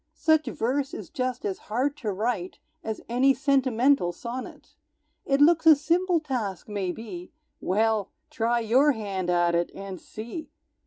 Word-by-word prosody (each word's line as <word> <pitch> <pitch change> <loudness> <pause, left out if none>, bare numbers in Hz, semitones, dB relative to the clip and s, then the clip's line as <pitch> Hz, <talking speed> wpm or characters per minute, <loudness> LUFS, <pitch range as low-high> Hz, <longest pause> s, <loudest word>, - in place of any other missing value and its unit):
Such 315 -1 +2
verse 270 +4 -1
is - - -8
just 255 -5 -3
as 195 -2 -2
hard 260 +6 0
to 220 -7 -3
write 195 -2 -2 0.3
As 220 -1 -4
any 260 +3 +3
sentimental 265 -6 +2
sonnet. 240 +8 -8 0.5
It 275 0 +2
looks 325 +2 +5
a 315 - +10
simple 340 +4 +1
task, 240 - -4
maybe, 195 -2 -5 0.3
Well 215 +1 +1 0.2
try 235 +1 +1
your 260 +6 +4
hand 195 -5 -3
at 175 -1 +2
it, 170 0 +1
and 195 -2 -7
see! 235 +9 -8
235 Hz, 145 wpm, -26 LUFS, 200-275 Hz, 0.5 s, a